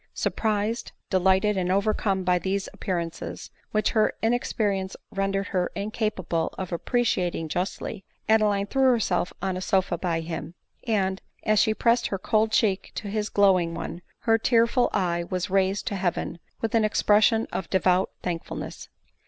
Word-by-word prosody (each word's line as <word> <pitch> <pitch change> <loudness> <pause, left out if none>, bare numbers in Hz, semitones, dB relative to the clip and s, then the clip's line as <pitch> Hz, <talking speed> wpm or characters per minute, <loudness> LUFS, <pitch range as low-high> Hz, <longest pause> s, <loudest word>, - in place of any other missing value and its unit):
Surprised, 215 +1 -1 0.2
delighted, 190 +2 +3
and 180 -1 0
overcome 195 -1 +1
by 180 0 +2
these 195 +2 -1
appearances, 170 -4 -4 0.2
which 215 0 +1
her 215 -1 +3
inexperience 205 -5 0 0.2
rendered 195 0 -1
her 180 -2 0
incapable 200 -5 -2
of 185 -1 -5
appreciating 180 -4 0
justly, 180 +3 -3 0.2
Adeline 210 -2 +3
threw 270 +6 -1
herself 215 -8 +2
on 190 -1 0
a 185 - -4
sofa 185 -2 +1
by 170 -3 -1
him; 165 +1 -6 0.3
and, 190 -4 +1 0.2
as 215 -1 +3
she 220 0 +3
pressed 235 +1 +2
her 195 - -2
cold 215 +3 +1
cheek 200 -4 +1
to 210 - -4
his 210 0 -2
glowing 185 -4 +3
one, 170 +1 -5 0.2
her 225 0 +3
tearful 235 +2 +3
eye 175 -3 0
was 185 +1 -2
raised 195 +1 +1
to 200 - -2
heaven 175 -2 -2 0.2
with 225 - -1
an 225 -1 +4
expression 215 +1 +3
of 180 - -3
devout 185 0 +2
thankfulness. 170 -2 -5
195 Hz, 150 wpm, -26 LUFS, 180-215 Hz, 0.3 s, an